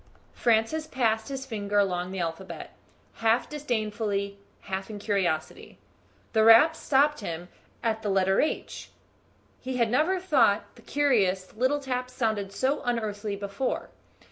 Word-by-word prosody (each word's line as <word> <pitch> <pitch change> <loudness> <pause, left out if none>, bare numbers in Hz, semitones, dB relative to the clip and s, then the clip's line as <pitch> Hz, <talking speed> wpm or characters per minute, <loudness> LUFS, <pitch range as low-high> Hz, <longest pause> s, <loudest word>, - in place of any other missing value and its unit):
Francis 235 +8 +1
passed 225 -5 0
his 270 -1 -5
finger 205 -4 -2
along 180 -3 +1
the 190 - -6
alphabet, 170 +2 -5 0.4
half 230 +2 +2
disdainfully, 215 -7 -2 0.2
half 190 0 -5
in 215 - -6
curiosity. 190 -6 -2 0.6
The 220 -1 +4
rap 230 +9 +7
stopped 295 0 +2
him 175 -3 -6 0.3
at 220 -1 0
the 210 - -2
letter 190 0 +3
H. 310 - -3 0.7
He 260 0 -4
had 230 -2 +2
never 320 +9 +2
thought 255 - +2
the - - -16
curious 200 -10 +1
little 260 +5 +1
taps 255 -2 -3
sounded 220 -6 -1
so 265 +7 0
unearthly 215 -4 -2
before. 200 +5 -3
220 Hz, 135 wpm, -27 LUFS, 200-260 Hz, 0.7 s, rap